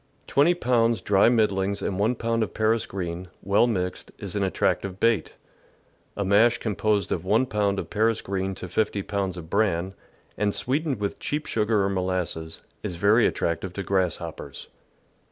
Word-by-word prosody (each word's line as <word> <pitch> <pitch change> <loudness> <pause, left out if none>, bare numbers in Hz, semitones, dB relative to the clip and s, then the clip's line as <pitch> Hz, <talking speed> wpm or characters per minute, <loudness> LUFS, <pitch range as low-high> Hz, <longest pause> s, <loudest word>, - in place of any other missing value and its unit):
Twenty 155 +6 +3
pounds 120 -7 +2
dry 100 +2 +4
middlings 100 -4 +1
and 95 - -2
1 110 +5 +2
pound 115 0 -1
of 110 - -2
Paris 110 +1 +1
green, 90 -1 -5 0.2
well 100 +5 +3
mixed, 90 -6 -3
is 100 -1 -5
an 100 - 0
attractive 95 0 0
bait. 115 -8 +1 0.8
A 100 - -1
mash 110 +5 +4
composed 105 -3 0
of 85 - -1
1 110 +7 +3
pound 105 -4 0
of - - -5
Paris 110 +1 +1
green 95 0 -3
to 90 - -7
50 100 +2 -1
pounds 95 -3 -2
of 80 -2 -9
bran, 95 -3 +1 0.5
and 105 0 +1
sweetened 140 -1 -1
with 100 -1 -3
cheap 150 +1 -2
sugar 105 -2 +1
or 95 - +1
molasses, 90 -4 -2 0.2
is 90 - -4
very 105 +7 +4
attractive 85 +2 -2
to 100 - -4
grasshoppers. 95 -4 -3
100 Hz, 165 wpm, -25 LUFS, 95-115 Hz, 0.8 s, dry